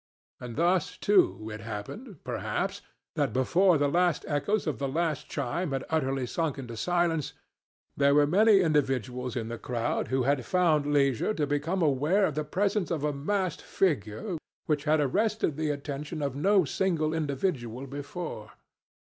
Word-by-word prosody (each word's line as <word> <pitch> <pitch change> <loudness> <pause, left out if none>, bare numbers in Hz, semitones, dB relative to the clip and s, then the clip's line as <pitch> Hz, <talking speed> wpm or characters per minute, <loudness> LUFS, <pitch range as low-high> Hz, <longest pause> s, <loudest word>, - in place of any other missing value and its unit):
And 120 -2 -7
thus, 175 +2 +1
too, 180 - +2
it 105 - -7
happened, 115 - -7
perhaps, 125 - -2 0.3
that 145 -7 0
before 170 +7 +4
the 145 0 +2
last 175 +2 +1
echoes 190 +9 0
of 155 - -2
the 140 - -1
last 160 0 -1
chime 145 +4 -2
had 135 - -2
utterly 135 -4 0
sunk 155 +3 -2
into 120 -4 -7
silence, 170 +2 0 0.6
there 140 0 +4
were 145 0 +6
many 200 +5 +5
individuals 130 - 0
in 115 -3 -2
the 115 0 -5
crowd 120 -2 -2
who 130 -1 +1
had 135 0 +1
found 155 -3 +2
leisure 140 - +2
to 150 - 0
become 150 +6 -1
aware 155 +8 +3
of 155 - -1
the 155 +2 -1
presence 195 +5 0
of 160 -4 -2
a 150 -1 0
masked 185 +6 -1
figure 155 - -1 0.3
which 150 -1 0
had 155 0 +3
arrested 200 - +1
the 155 0 -1
attention 145 +2 -4
of 140 -2 -2
no 190 +4 +3
single 160 -1 0
individual 140 -5 -2
before. 140 -4 -6
150 Hz, 160 wpm, -28 LUFS, 135-175 Hz, 0.6 s, were